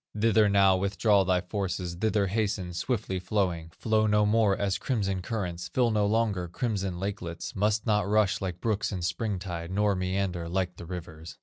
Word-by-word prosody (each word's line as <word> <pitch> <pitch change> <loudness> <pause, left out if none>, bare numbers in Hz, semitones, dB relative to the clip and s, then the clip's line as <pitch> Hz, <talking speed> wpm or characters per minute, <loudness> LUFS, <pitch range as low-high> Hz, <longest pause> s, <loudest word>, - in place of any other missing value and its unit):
Thither 110 -1 +4
now 100 -1 +5
withdraw 100 +1 +2
thy 90 -1 +2
forces, 90 -2 -3
Thither 105 +2 +1
hasten, 100 -3 -1
swiftly 95 -1 -2
flowing; 90 -4 -1
Flow 110 +5 +1
no 105 0 +3
more 105 -2 +3
as 100 -1 0
crimson 100 -7 -1
currents, 90 -5 -4
Fill 120 -3 +1
no 105 -1 +2
longer 105 -5 +1
crimson 95 -2 -2
lakelets, 95 -4 -5
Must 105 +2 +1
not 105 -3 +1
rush 105 -2 +2
like 90 -2 -4
brooks 105 -3 0
in 90 -3 -4
spring 105 +3 -1
tide, 85 -2 -5
Nor 100 +2 +2
meander 90 -2 -2
like 90 -1 -1
the 85 - -9
rivers. 80 -3 -8
100 Hz, 175 wpm, -28 LUFS, 90-105 Hz, -, now